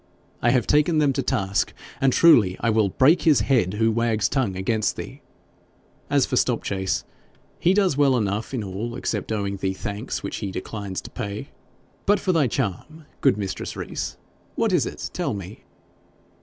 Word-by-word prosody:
I 120 - +3
have 120 -2 +2
taken 150 +2 +3
them 145 -3 +3
to 135 - 0
task, 95 -6 0 0.3
and 135 -1 +4
truly 115 - +5
I 115 - +1
will 110 -2 +2
break 145 - +4
his 155 -4 +4
head 110 -8 +1
who 110 +1 +2
wags 115 -1 +1
tongue 125 -9 -1
against 110 +3 0
thee. - - -8 0.9
As - - +3
for - - -2
Stopchase, 95 -1 0 0.6
he 180 +3 +3
does 190 -8 +2
well 140 -3 +4
enough 105 0 -2
in 125 -5 -2
all 105 +5 -5
except 110 -4 -3
owing 100 -2 -2
thee 95 0 -1
thanks 105 +5 -4
which - - -4
he 100 - -4
declines 95 0 -5
to - - -11
pay. 105 -4 -5 0.6
But 205 +1 +4
for 190 - 0
thy 160 -6 +3
charm, 135 - -3 0.2
good 135 -7 +4
mistress 100 -2 -4
Rees, - - -5 0.4
what - - +1
is - - +2
it - - -6
tell - - -2
me 100 +1 -9
115 Hz, 175 wpm, -24 LUFS, 100-135 Hz, 0.9 s, truly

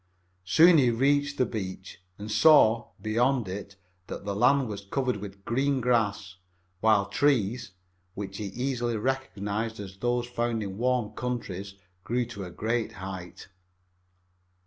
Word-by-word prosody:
Soon 165 - +6
he 125 -3 +4
reached 140 +4 +1
the 130 - +3
beach 95 -5 -6 0.2
and 105 +1 -7
saw, 120 -6 +5
beyond 120 +3 +1
it, 100 +1 -6 0.3
that - - -7
the 100 -1 -2
land 130 +4 +3
was 100 -2 -5
covered 125 +3 -1
with 100 0 -10
green 135 +3 +1
grass, 105 -6 0 0.4
while 110 -1 +4
trees, 115 -2 +1 0.4
which 100 -1 -6
he 105 - -4
easily 120 +2 -2
recognized 110 -3 -2
as 95 -2 -8
the 120 +4 0
kind 120 0 0
found 120 -2 -1
in 100 0 -6
warm 125 -3 +1
countries, 100 -5 -5 0.3
grew 120 +1 0
to 110 -4 -7
a - - -7
great 110 +5 -2
height. 95 -1 -8
110 Hz, 145 wpm, -27 LUFS, 100-125 Hz, 0.4 s, Soon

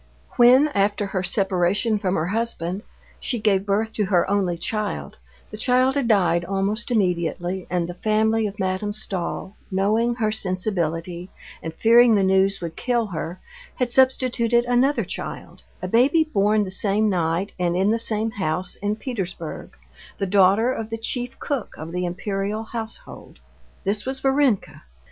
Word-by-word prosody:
When, 255 +5 +6
after 205 -3 0
her 195 -1 -2
separation 190 +3 +1
from 190 -2 0
her 155 - 0
husband, 200 -4 -2 0.4
she 245 - -2
gave 205 -2 +1
birth 220 +3 0
to 210 - 0
her 185 -3 +2
only 190 -3 0
child, 215 +4 -4 0.3
the 215 - -7
child 255 +3 +2
had 275 -4 0
died 180 -6 +3
almost 195 +6 -1
immediately, 180 -3 -1
and 175 -1 -1
the 175 - -6
family 220 +3 +1
of 200 0 -8
Madame 190 +1 -2
Stahl, 195 -1 -3
knowing 215 +5 +1
her 220 -3 0
sensibility, 180 -3 -2 0.3
and 160 - -5
fearing 230 +5 +5
the 200 - +3
news 190 +1 +2
would 165 -2 -5
kill 240 -2 0
her, 175 -2 -5 0.4
had 250 -2 -1
substituted 240 -2 +3
another 250 +4 +2
child, - - -7 0.2
a - - -1
baby 260 - +4
born 210 -7 +2
the 190 - -5
same 205 +2 +1
night 175 0 0
and 175 -1 0
in 195 +3 +2
the 230 - +1
same 220 0 0
house 185 -3 -1
in 205 +1 -1
Petersburg, 190 - -6 0.4
the 195 - -1
daughter 200 +5 +4
of 225 -3 -5
the 225 - -3
chief 245 +2 -3
cook 280 -6 -4
of 160 +2 -7
the 180 +1 -2
Imperial 195 +4 -3
Household. 225 0 -7 0.5
This 205 +1 -1
was 265 0 -2
Varenka. 270 -6 +1
205 Hz, 160 wpm, -23 LUFS, 185-230 Hz, 0.5 s, When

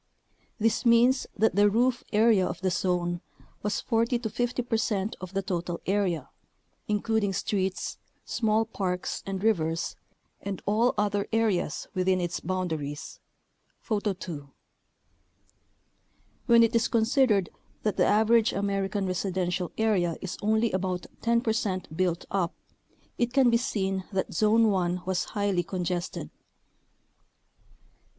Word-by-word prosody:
This 225 +1 +1
means 240 +2 +4
that 220 -2 +2
the 205 +1 +5
roof 240 +3 +1
area 215 -2 +4
of - - -5
the 190 -1 +1
zone 175 -1 0 0.4
was 210 0 -1
40 230 +1 +1
to 230 -3 -4
50 245 +2 -1
percent 220 -3 -1
of 185 +1 -8
the 195 - 0
total 175 -2 -3
area, 185 -7 0 0.6
including 210 -1 0
streets, 190 0 -2 0.3
small 220 -1 +1
parks 185 -5 -3
and 195 0 -3
rivers, 165 -6 +1 0.5
and 195 -2 -4
all 220 +4 +2
other 205 -1 0
areas 220 -8 0
within 185 0 +2
its 175 0 -2
boun 185 +1 -2
daries 145 -2 -5 0.6
(Photo 210 -3 -1
2). 155 -6 -7 2.0
When 235 -1 +7
it 230 +1 +2
is 230 - +3
considered 225 - +2 0.3
that 210 - 0
the - - +4
average 220 +1 +4
American 195 0 -1
residential 185 -1 -1
area 190 -7 +1
is 190 - -5
only 220 +2 +2
about 185 -1 -2 0.2
10 235 0 +2
percent 200 -8 -2
built 175 -1 0
up, 185 -3 0 0.6
it 240 0 +1
can 260 -3 +5
be 235 - +5
seen 195 -6 -1
that 190 -1 -2
Zone 215 +5 +4
1 180 -2 0
was 185 -1 0
highly 200 -4 0
congested. 175 0 -3
200 Hz, 130 wpm, -27 LUFS, 180-225 Hz, 2.0 s, When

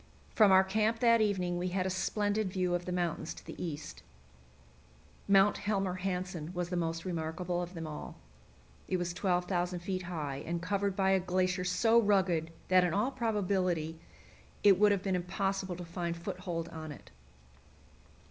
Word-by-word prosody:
From 210 -3 +6
our 190 0 +7
camp 215 +4 +1
that 230 -1 +4
evening 180 -4 0
we 180 - -1
had 185 0 -1
a 190 - 0
splendid 205 +1 0
view 180 -1 0
of 175 0 -1
the 180 - -3
mountains 175 -3 -2
to - - -13
the - - -7
east. 155 -4 -6 1.3
Mount 195 +1 +5
Helmer 195 -3 0
Hansen 180 -4 -3
was 175 -1 -2
the 180 - -2
most 165 0 -2
remarkable 175 +1 -2
of 175 +1 -6
them 165 -1 -5
all; 150 -1 -7 0.7
it 185 - 0
was 175 -1 -2
12,000 180 -1 0
feet 185 +1 -3
high, 155 -6 -4
and 170 +4 -3
covered 200 +2 -1
by 190 -1 +2
a 190 - +4
glacier 185 0 0
so 225 +6 +4
rugged 185 -6 +2 0.2
that 185 -1 +6
in 175 -2 0
all 220 +7 +1
probability 185 - -1 0.6
it 195 -3 +6
would 210 0 +6
have 200 -2 0
been 190 -2 0
impossible 190 +1 -2
to 175 0 -7
find 170 0 -3
foothold 175 -2 -4
on 160 -2 -7
it. 145 - -12
180 Hz, 170 wpm, -32 LUFS, 175-195 Hz, 1.3 s, our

